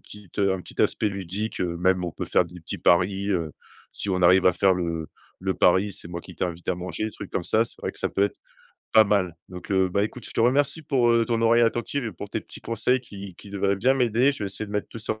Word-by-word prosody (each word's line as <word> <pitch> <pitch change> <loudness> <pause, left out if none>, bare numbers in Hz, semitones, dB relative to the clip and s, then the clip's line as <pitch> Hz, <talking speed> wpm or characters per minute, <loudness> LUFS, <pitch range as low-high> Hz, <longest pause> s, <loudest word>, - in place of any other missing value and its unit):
petite 105 -3 -13
heu, 100 -1 +3
un 95 - -3
petit - - -7
aspect 105 - +2
ludique, 100 +2 -4
heu. 85 -2 -1
Même 90 0 +2
on 85 - -4
peut - - -4
faire 90 - +3
des 90 +1 -12
petits 80 - -6
paris, 95 +3 +2
heu, 85 -5 -1 0.4
si 100 - -4
on 90 -1 0
arrive 90 +2 +6
à 90 - +6
faire 95 +1 +3
le 85 -3 -3 0.3
le 95 0 -1
pari: 95 +3 +3
«C'est 85 - -9
moi 85 0 -5
qui - - -12
t'invite 85 -1 -4
à - - +2
manger», 90 +3 -4
des 110 - -3
trucs 100 - -9
comme 90 - -2
ça, 110 +1 +3
c'est - - -13
vrai - - -3
que - - -8
ça - - 0
peut 100 - +1
être 100 - -4 0.5
pas 110 -1 +7
mal. 95 -4 +1 0.2
Donc, 90 +2 -9
heu, 95 -1 +3
bah, 100 +2 +1
écoute, 110 +2 -4
je - - -9
te - - -1
remercie 140 +6 +2
pour, 125 -5 +2
heu, 115 -1 +3
ton 115 -1 0
oreille 115 +1 +5
attentive 120 +3 0
et - - -3
pour 100 +4 -9
tes - - -2
petits - - -11
conseils 125 +2 +1
qui 100 -5 -9
qui 100 - -13
devraient 100 0 0
bien 130 +7 +3
m'aider. 125 +2 +3
Je - - -8
vais 105 - -3
essayer 100 +2 -4
de - - -11
mettre 105 -1 -2
tout - - -11
ça 110 0 -3
100 Hz, 275 wpm, -25 LUFS, 90-110 Hz, 0.5 s, pas